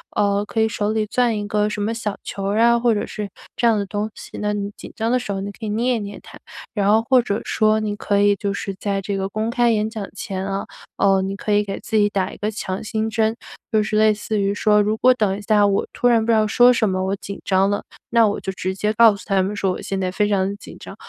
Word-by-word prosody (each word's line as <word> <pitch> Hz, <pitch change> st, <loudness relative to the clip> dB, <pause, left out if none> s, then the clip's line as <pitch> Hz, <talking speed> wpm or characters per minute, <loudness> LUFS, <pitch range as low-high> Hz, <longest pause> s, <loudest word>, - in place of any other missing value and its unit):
呃， 205 Hz, 0 st, +1 dB
可 220 Hz, +1 st, -1 dB
以 220 Hz, -, +3 dB
手 210 Hz, -1 st, -1 dB
里 220 Hz, -1 st, 0 dB
攥 235 Hz, 0 st, +1 dB
一 205 Hz, -, -4 dB
个 210 Hz, 0 st, +1 dB
什 210 Hz, 0 st, -4 dB
么 225 Hz, +2 st, -1 dB
小 215 Hz, -3 st, -4 dB
球 195 Hz, -, -5 dB
儿 205 Hz, +2 st, 0 dB
啊， 235 Hz, +1 st, +5 dB
或 235 Hz, -1 st, +3 dB
者 205 Hz, -, -1 dB
是 210 Hz, -1 st, -6 dB, 0.3 s
这 235 Hz, -, +3 dB
样 225 Hz, -2 st, +4 dB
的 200 Hz, -, -2 dB
东 205 Hz, +2 st, -3 dB
西， -, -, -10 dB
那 210 Hz, 0 st, 0 dB
你 205 Hz, 0 st, -3 dB
紧 -, -, -10 dB
张 225 Hz, +1 st, -1 dB
的 250 Hz, -, +3 dB
时 210 Hz, -5 st, -4 dB
候 195 Hz, -, -3 dB
你 200 Hz, +1 st, -5 dB
可 220 Hz, +3 st, -9 dB
以 -, -, -3 dB
捏 240 Hz, +4 st, +1 dB
一 -, -, -3 dB
捏 205 Hz, 0 st, -7 dB
它。 -, -, -13 dB, 0.3 s
然 200 Hz, -2 st, +1 dB
后 220 Hz, +1 st, +5 dB
或 260 Hz, -2 st, +6 dB
者 210 Hz, -3 st, -2 dB
说 215 Hz, 0 st, +2 dB
你 210 Hz, -1 st, -3 dB
可 200 Hz, -1 st, +1 dB
以 205 Hz, 0 st, +5 dB
就 200 Hz, 0 st, -2 dB
是 200 Hz, 0 st, -4 dB
在 200 Hz, -1 st, -1 dB
这 195 Hz, +1 st, -3 dB
个 190 Hz, 0 st, -2 dB
公 215 Hz, +3 st, -2 dB
开 240 Hz, 0 st, +2 dB
演 215 Hz, -1 st, 0 dB
讲 215 Hz, -3 st, -6 dB
前 190 Hz, -1 st, -4 dB
啊， 195 Hz, 0 st, -3 dB, 0.3 s
呃， 195 Hz, -1 st, +3 dB
你 195 Hz, +1 st, -3 dB
可 210 Hz, -, -4 dB
以 205 Hz, 0 st, +3 dB
给 195 Hz, -, -5 dB
自 220 Hz, -, -1 dB
己 205 Hz, -1 st, +4 dB
打 195 Hz, -2 st, -1 dB
一 -, -, -11 dB
个 210 Hz, -, -2 dB
强 195 Hz, -3 st, -4 dB
心 220 Hz, +1 st, -2 dB
针， 220 Hz, 0 st, +1 dB, 0.4 s
就 215 Hz, -1 st, +4 dB
是 215 Hz, 0 st, -1 dB
类 215 Hz, 0 st, +5 dB
似 210 Hz, 0 st, -3 dB
于 200 Hz, 0 st, +1 dB
说： 210 Hz, 0 st, +3 dB
“如 210 Hz, +1 st, +1 dB
果 255 Hz, +3 st, +5 dB
等 205 Hz, -5 st, 0 dB
一 -, -, -8 dB
下 205 Hz, -1 st, +3 dB
我 200 Hz, -1 st, +1 dB
突 245 Hz, -, 0 dB
然 230 Hz, -2 st, +3 dB
不 230 Hz, -, +2 dB
知 -, -, +4 dB
道 215 Hz, -1 st, +3 dB
说 245 Hz, +3 st, +6 dB
什 230 Hz, -4 st, +2 dB
么 185 Hz, 0 st, -1 dB
我 195 Hz, -, 0 dB
紧 200 Hz, +1 st, -8 dB
张 190 Hz, 0 st, +2 dB
了， 205 Hz, -, -1 dB, 0.3 s
那 230 Hz, -1 st, +5 dB
我 205 Hz, -, -2 dB
就 190 Hz, -, -5 dB
直 185 Hz, 0 st, -3 dB
接 210 Hz, +3 st, -1 dB
告 225 Hz, -1 st, +6 dB
诉 -, -, -12 dB
他 195 Hz, -2 st, +2 dB
们 195 Hz, -, -2 dB
说， 195 Hz, -2 st, 0 dB
我 -, -, -7 dB
现 195 Hz, -1 st, -3 dB
在 185 Hz, -, -1 dB
非 205 Hz, +2 st, 0 dB
常 195 Hz, -1 st, 0 dB
紧 205 Hz, -, -12 dB
张。 -, -, -10 dB
210 Hz, 310 characters per minute, -21 LUFS, 200-220 Hz, 0.4 s, 或